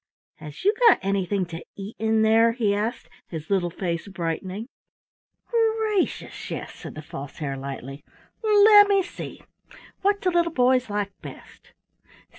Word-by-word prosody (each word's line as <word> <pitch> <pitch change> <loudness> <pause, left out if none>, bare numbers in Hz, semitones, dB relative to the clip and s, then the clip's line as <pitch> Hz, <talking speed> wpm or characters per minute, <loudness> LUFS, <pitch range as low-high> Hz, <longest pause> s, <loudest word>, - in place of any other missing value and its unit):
"Has 150 - -10
you 410 - +5
got - - +7
anything 195 -1 0
to 165 -1 -8
eat 200 +2 -8
in 220 0 +2
there?" 225 +1 +4
he 220 -4 +1
asked, 220 +4 -2 0.2
his 160 +1 -7
little 185 -3 +2
face 170 0 -4
brightening. 185 +4 -4 0.8
"Gracious, 445 -4 0
yes," - - -5
said - - -10
the 155 - -8
False 140 -1 -8
Hare 140 -4 -3
lightly. 135 +1 -7 0.4
"Lemme 410 -2 +6
see! - - -9 0.6
What 405 +1 +2
do 365 - 0
little 340 -1 +1
boys 255 -2 +3
like 205 -1 -2
best? - - -13
210 Hz, 140 wpm, -24 LUFS, -, 0.8 s, got